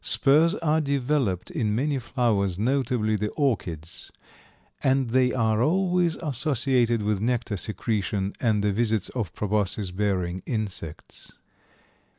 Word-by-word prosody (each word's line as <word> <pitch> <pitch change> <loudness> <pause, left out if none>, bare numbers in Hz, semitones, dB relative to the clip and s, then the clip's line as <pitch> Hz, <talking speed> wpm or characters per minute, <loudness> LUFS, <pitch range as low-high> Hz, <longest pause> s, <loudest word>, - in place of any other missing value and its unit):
Spurs 150 - +4
are 160 -4 +1
developed 140 - 0
in 105 -2 -1
many 140 +3 0
flowers, 110 -7 0
notably 120 -2 +1
the 105 0 -1
orchids, 90 - -2 0.7
and 130 -3 +2
they 130 0 +3
are 110 -3 +1
always 175 +2 +2
associated 130 -5 +1
with 105 -1 0
nectar 115 -2 -1
secretion 100 -1 -2
and 110 -4 +1
the 105 -1 +1
visits 110 -2 0
of 110 -10 -3
proboscis 105 -2 -1
bearing 95 -2 -1
insects. 100 - -6
115 Hz, 120 wpm, -25 LUFS, 105-135 Hz, 0.7 s, Spurs